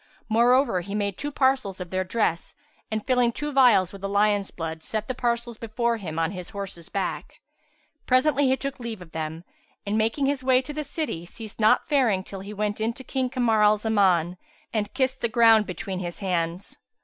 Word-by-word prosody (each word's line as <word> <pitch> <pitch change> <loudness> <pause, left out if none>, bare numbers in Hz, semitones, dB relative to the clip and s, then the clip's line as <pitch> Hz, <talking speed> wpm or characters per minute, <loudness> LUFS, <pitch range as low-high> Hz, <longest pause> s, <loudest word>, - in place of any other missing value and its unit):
Moreover 235 -2 +3
he 200 +3 -6
made 200 -2 -1
two 290 - -4
parcels 260 -9 +1
of 180 -2 -7
their 185 0 0
dress 185 -3 -1 0.3
and, 215 -1 -3
filling 250 -2 +3
two 295 +5 -4
vials 245 - +5
with 195 - -10
the 195 - -3
lion's 205 0 +2
blood, 160 -1 -5
set 215 +5 -3
the 255 - -2
parcels 235 -2 -2
before 235 +1 -1
him 165 -7 -6
on 165 0 +1
his 180 -3 -7
horse's 195 -4 -6
back. 175 -6 -4 0.7
Presently 275 +2 +3
he 260 +1 +2
took 275 0 -5
leave 225 -6 -6
of 165 - -18
them 160 +1 -5 0.4
and, 210 +2 0
making 225 +6 +1
his 275 -1 0
way 255 -1 +4
to 265 +3 -6
the 305 +1 -3
city, 285 - -4
ceased 220 +3 -9
not 215 0 +4
faring 235 -10 +2
till 195 0 -8
he 200 +2 -8
went 210 0 -2
in 225 +2 0
to 260 - -11
King 260 0 -1
Kamar 240 -4 +2
al 210 0 +5
Zaman 190 -5 +2 0.4
and 210 -2 -1
kissed 260 0 0
the 235 - +1
ground 225 -2 +5
between 185 +1 -5
his 175 -2 -5
hands. 180 -1 -2
215 Hz, 200 wpm, -25 LUFS, 185-250 Hz, 0.7 s, vials